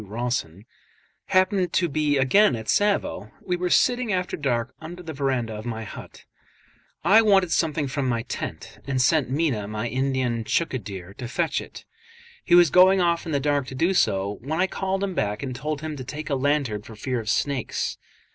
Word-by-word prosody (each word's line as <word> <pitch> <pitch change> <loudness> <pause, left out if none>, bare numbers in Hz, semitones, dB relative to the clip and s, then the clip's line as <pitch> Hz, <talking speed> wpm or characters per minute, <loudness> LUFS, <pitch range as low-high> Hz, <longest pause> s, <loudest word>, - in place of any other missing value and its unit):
Rawson) 105 -4 -3 0.6
happened 185 -1 +2
to 175 - +2
be 150 -1 +1
again 135 - +4
at 110 -1 -6
Tsavo, 205 0 +1
we 180 - -2
were 180 0 -2
sitting 245 +3 +2
after 180 -1 -1
dark 125 -4 -1
under 175 +3 -8
the 160 -2 -6
verandah 130 -5 -1
of 105 0 -7
my 115 -1 -4
hut. 105 - -11 0.8
I 200 +7 +6
wanted 195 -5 +3
something 155 -3 +1
from 135 0 -2
my 115 -1 -1
tent, - - -6
and 135 -2 0
sent 140 0 +3
Meeanh, 130 -8 -1
my 105 +2 -3
Indian 130 -2 -1
chaukidar, 100 - -3
to 125 - -4
fetch 165 +6 -1
it. - - -11 0.6
He 175 - +4
was 175 -4 +6
going 185 +1 +6
off 170 -1 +1
in - - -3
the 140 - +1
dark 145 -1 0
to 130 - -7
do 170 +8 +2
so, 100 - +1
when 155 +6 -3
I 185 - +4
called 190 0 -2
him 195 -2 -2
back 105 -5 -2
and 130 -2 -4
told 150 +3 -4
him 155 -1 -4
to 130 - -6
take 150 +4 -6
a - - +2
lantern 135 -6 0
for 110 +1 -12
fear 125 +3 -2
of 110 -1 -5
snakes. 140 -1 -1
140 Hz, 195 wpm, -24 LUFS, 120-175 Hz, 0.8 s, I